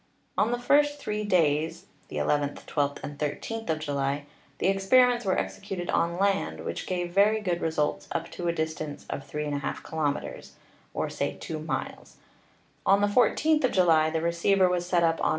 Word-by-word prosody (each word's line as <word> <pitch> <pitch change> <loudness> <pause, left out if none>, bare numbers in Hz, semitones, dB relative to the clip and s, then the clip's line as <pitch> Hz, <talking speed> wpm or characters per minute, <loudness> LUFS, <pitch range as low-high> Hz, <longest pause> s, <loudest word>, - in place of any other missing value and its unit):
On 220 - +2
the 245 - +1
first 290 +3 +3
three 210 -6 -3
days, 160 -4 +1 0.2
viz., - - -5
nth, 145 -1 -1
12th 145 -1 -1
and 145 0 -7
13th 195 +9 -3
of 160 - +1
July, 145 -1 -2 0.3
the - - -2
experiments 240 +5 +4
were 190 - +2
executed 195 -3 -3
on 170 +1 +1
land, 195 0 0
which - - -4
gave 175 -1 -2
very 210 +3 +4
good 180 -5 -2
results 150 -2 -1
up 165 0 -3
to 175 - -4
a - - +3
distance 155 -2 -4
of 140 - -6
3^ 150 -1 -3
kilometers, 150 -3 -3 0.4
or - - 0
say - - -3
2 155 - -5
miles; 155 - -5 0.7
on 200 +1 +4
the 205 - +4
14th 300 +8 +3
of 255 - +3
July 165 -4 +4
the 160 0 -1
receiver 170 +3 +3
was 180 -1 -1
set 175 -1 +2
up 165 0 +1
on. - - +3
170 Hz, 175 wpm, -27 LUFS, 155-200 Hz, 0.7 s, experiments